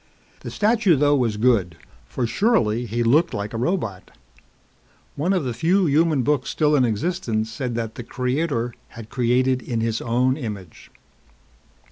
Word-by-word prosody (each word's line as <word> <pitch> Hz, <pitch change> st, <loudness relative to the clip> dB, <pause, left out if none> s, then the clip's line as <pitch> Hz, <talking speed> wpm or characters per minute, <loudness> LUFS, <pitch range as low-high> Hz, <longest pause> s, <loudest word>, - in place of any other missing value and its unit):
The -, -, -7 dB
statue 210 Hz, -4 st, +2 dB
though 145 Hz, +1 st, +3 dB
was 115 Hz, -6 st, 0 dB
good 105 Hz, -8 st, +2 dB, 0.3 s
for 125 Hz, -, -2 dB
surely 120 Hz, -, +1 dB
he 120 Hz, +2 st, -1 dB
looked 150 Hz, +9 st, +3 dB
like 105 Hz, +2 st, -4 dB
a -, -, -3 dB
robot. 115 Hz, -, -2 dB, 1.1 s
One 160 Hz, +6 st, 0 dB
of 185 Hz, -5 st, +1 dB
the 125 Hz, -2 st, -3 dB
few 180 Hz, -, +2 dB
human 155 Hz, -2 st, +2 dB
books 145 Hz, 0 st, 0 dB
still 150 Hz, -1 st, +2 dB
in 130 Hz, -3 st, +4 dB
existence 115 Hz, -, -2 dB
said 120 Hz, +1 st, -4 dB
that 115 Hz, -2 st, -3 dB
the 120 Hz, -, -7 dB
Creator 125 Hz, 0 st, -2 dB, 0.2 s
had 115 Hz, -1 st, -9 dB
created 130 Hz, 0 st, +1 dB
in 115 Hz, -2 st, -3 dB
his 115 Hz, -1 st, -1 dB
own 125 Hz, +3 st, +1 dB
image. 105 Hz, -, -8 dB
125 Hz, 155 wpm, -22 LUFS, 115-150 Hz, 1.1 s, in